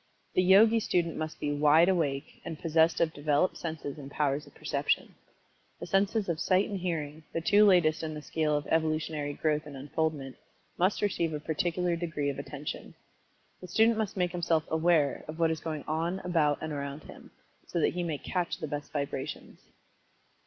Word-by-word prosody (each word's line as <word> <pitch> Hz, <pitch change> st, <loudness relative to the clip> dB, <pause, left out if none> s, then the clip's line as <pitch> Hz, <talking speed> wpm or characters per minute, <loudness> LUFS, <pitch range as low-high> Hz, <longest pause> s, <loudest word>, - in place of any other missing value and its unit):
The -, -, +3 dB
Yogi 210 Hz, +5 st, +6 dB
student 175 Hz, -6 st, 0 dB
must 155 Hz, 0 st, -5 dB
be 145 Hz, -, -1 dB
"wide 150 Hz, +3 st, +5 dB
awake" 150 Hz, -7 st, -1 dB
and 160 Hz, -, -6 dB
possessed 160 Hz, +1 st, +2 dB
of 165 Hz, -1 st, +2 dB
developed 145 Hz, +4 st, +1 dB
senses 155 Hz, -3 st, -5 dB
and 140 Hz, -1 st, -8 dB
powers 145 Hz, 0 st, -1 dB
of -, -, -18 dB
Perception. -, -, -1 dB, 0.7 s
The -, -, -5 dB
senses 195 Hz, +4 st, +1 dB
of 165 Hz, -3 st, -1 dB
Sight 185 Hz, +3 st, +2 dB
and 200 Hz, -2 st, -4 dB
Hearing, 160 Hz, -4 st, -3 dB
the -, -, 0 dB
two 205 Hz, +5 st, +5 dB
latest 170 Hz, -5 st, +4 dB
in 155 Hz, -1 st, -4 dB
the 150 Hz, -, -7 dB
scale 155 Hz, -1 st, 0 dB
of 145 Hz, -, -4 dB
Evolutionary 155 Hz, -2 st, 0 dB
growth 150 Hz, 0 st, -1 dB
and 140 Hz, -2 st, -8 dB
unfoldment, 145 Hz, -1 st, -3 dB, 0.4 s
must 185 Hz, +4 st, +1 dB
receive 170 Hz, -5 st, 0 dB
a -, -, -3 dB
particular 170 Hz, +3 st, -1 dB
degree 155 Hz, -4 st, -2 dB
of 140 Hz, -, -7 dB
attention. 145 Hz, +1 st, -6 dB, 0.7 s
The 180 Hz, -, -8 dB
student 225 Hz, +5 st, +4 dB
must 210 Hz, -2 st, -2 dB
make 180 Hz, -1 st, +1 dB
himself 170 Hz, -2 st, +1 dB
"aware" 160 Hz, -3 st, +2 dB
of 155 Hz, +1 st, -7 dB
what 165 Hz, -1 st, +2 dB
is 160 Hz, -, -2 dB
going 155 Hz, -2 st, -4 dB
on 165 Hz, +4 st, -1 dB
about 160 Hz, -5 st, +2 dB
and 155 Hz, -1 st, -4 dB
around 140 Hz, +1 st, -5 dB
him, -, -, -13 dB, 0.4 s
so 170 Hz, -, -2 dB
that -, -, +2 dB
he 180 Hz, -, -2 dB
may 165 Hz, -4 st, -2 dB
"catch" 175 Hz, +4 st, -2 dB
the -, -, -4 dB
best 145 Hz, 0 st, -5 dB
vibrations. 140 Hz, -2 st, -4 dB
160 Hz, 185 wpm, -29 LUFS, 150-175 Hz, 0.7 s, Yogi